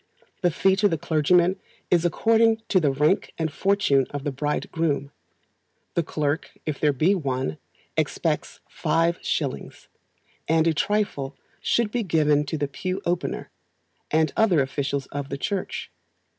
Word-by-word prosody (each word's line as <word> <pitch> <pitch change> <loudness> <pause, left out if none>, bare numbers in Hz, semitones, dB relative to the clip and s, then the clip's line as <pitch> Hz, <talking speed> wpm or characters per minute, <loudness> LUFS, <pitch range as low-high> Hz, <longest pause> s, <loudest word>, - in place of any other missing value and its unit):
The 180 - +4
fee 190 +3 +3
to 210 - +4
a 165 - 0
clergyman 170 +4 +2 0.3
is 175 -1 +4
according 225 +5 +3
to 185 - +4
the 150 -5 +2
rank 150 +7 +1
and 160 -2 -2
fortune 190 -9 +2
of 145 -1 -5
the 145 - -1
bridegroom; 145 +1 -1 0.8
the 170 - +2
clerk 150 -1 -2
if 155 -3 -3
there 150 - +3
be 155 +8 +3
one, 130 - -2 0.4
expects - - -1
five 165 +1 +1
shillings, 140 -4 -3 0.6
and 160 0 +3
a 165 - +3
trifle 150 -7 -1 0.2
should 230 -3 +1
be 245 - 0
given 150 -6 +2
to 160 - -2
the 145 -1 -1
pew 185 +7 -3
opener, 175 0 -2 0.6
and 155 -1 +2
other 200 -8 +4
officials 140 0 -2
of 145 -1 -4
the 140 - -3
church. 190 +6 -3
160 Hz, 145 wpm, -25 LUFS, 145-185 Hz, 0.8 s, The